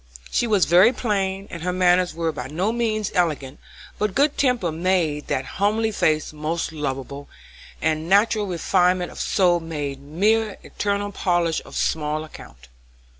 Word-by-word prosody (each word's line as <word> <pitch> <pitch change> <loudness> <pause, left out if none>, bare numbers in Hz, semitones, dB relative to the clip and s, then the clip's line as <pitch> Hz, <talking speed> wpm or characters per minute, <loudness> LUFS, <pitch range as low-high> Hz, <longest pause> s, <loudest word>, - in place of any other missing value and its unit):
She 240 - +1
was 205 -5 +3
very 180 +7 +6
plain, 195 -5 -2
and 170 - -7
her 180 +2 -1
manners 180 -1 +2
were 165 -1 -1
by - - -6
no 180 +9 -1
means 220 -3 -1
elegant, 150 -7 -1 0.4
but 210 -2 -1
good 285 +1 +3
temper 245 - +1
made 165 -3 0
that 130 - -1 0.2
homely 220 +2 +2
face 155 -6 0
most 155 +2 -3
lovable, 140 -2 -5 0.5
and 160 +1 0
natural 205 +1 +3
refinement 180 0 +1
of - - -7
soul 175 -3 +2
made 145 -4 -5
mere 205 +8 +1
external 205 0 -2
polish 175 -4 0
of - - -12
small 155 0 -1
account. 60 - -13
180 Hz, 150 wpm, -23 LUFS, 155-205 Hz, 0.5 s, very